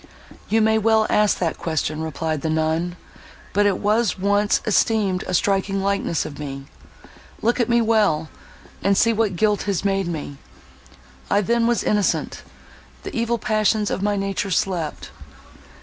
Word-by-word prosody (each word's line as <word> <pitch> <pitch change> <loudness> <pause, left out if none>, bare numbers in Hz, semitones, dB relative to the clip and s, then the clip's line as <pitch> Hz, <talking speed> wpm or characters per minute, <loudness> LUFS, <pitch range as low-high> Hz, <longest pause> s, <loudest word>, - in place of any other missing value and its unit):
"You 225 +1 +3
may 220 0 +3
well 220 0 +3
ask 210 -1 +3
that 165 -3 -2
question," 155 -1 -2
replied 160 -1 -3
the 160 - -2
nun,—"but 165 +5 -2
it 195 - +1
was 215 +1 +1
once 205 +2 +2
esteemed 210 -3 +1
a 185 - -1
striking 195 +1 0
likeness 195 -4 0
of 145 - -8
me. 135 -2 -6 0.8
Look 235 +3 +1
at 240 - +1
me 235 0 +3
well, 205 -9 +2 0.5
and 200 0 +2
see 230 +2 +4
what 215 -4 0
guilt 210 +3 +1
has 200 0 -1
made 195 -2 +1
me. 150 -4 -5 0.9
I 205 - +3
then 235 +3 +1
was 240 -2 +1
innocent; 205 -2 0 0.6
the - - -7
evil 235 0 0
passions 215 -1 +1
of - - -2
my 205 0 +1
nature 195 0 -2
slept. 180 -4 -2
200 Hz, 150 wpm, -22 LUFS, 170-220 Hz, 0.9 s, see